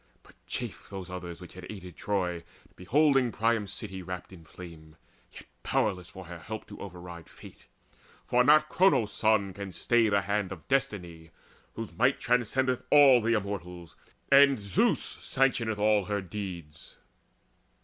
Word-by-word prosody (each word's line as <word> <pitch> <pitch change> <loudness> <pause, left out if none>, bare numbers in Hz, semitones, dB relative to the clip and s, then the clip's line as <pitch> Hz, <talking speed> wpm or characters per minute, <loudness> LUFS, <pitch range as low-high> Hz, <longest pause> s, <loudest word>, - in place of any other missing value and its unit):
But - - -19
chafed - - -6
those 95 -2 -7
others 90 -2 -7
which 90 - -12
had 90 0 -10
aided 90 -5 -9
Troy, 90 -4 -2 0.3
Beholding 135 +4 +2
Priam's 110 -2 0
city 95 -2 -6
wrapped 90 +1 -7
in 85 -3 -13
flame, 80 -2 -12 0.4
Yet - - -12 0.2
powerless 90 -4 -1
for 95 -1 -11
her 85 0 -9
help 110 +6 -7
to - - -10
override 90 -3 -9
Fate; - - -15 0.6
for 125 0 +3
not 155 +3 +5
Cronos' 155 - +3
Son 105 -3 +1
can 100 0 -7
stay 115 +3 +2
the 100 -1 +2
hand 100 -1 -1
Of 90 -4 -9
Destiny, 90 -11 -2 0.5
whose 115 -1 -6
might 125 +4 +2
transcendeth 125 +1 +1
all 140 -4 +7
The 115 +1 +1
Immortals, 90 -5 -4 0.4
and 140 -2 +6
Zeus 100 -2 +1
sanctioneth 120 -5 0
all 105 -1 +2
her 105 +1 -1
deeds. 85 -5 -8
100 Hz, 150 wpm, -29 LUFS, 90-115 Hz, 0.6 s, all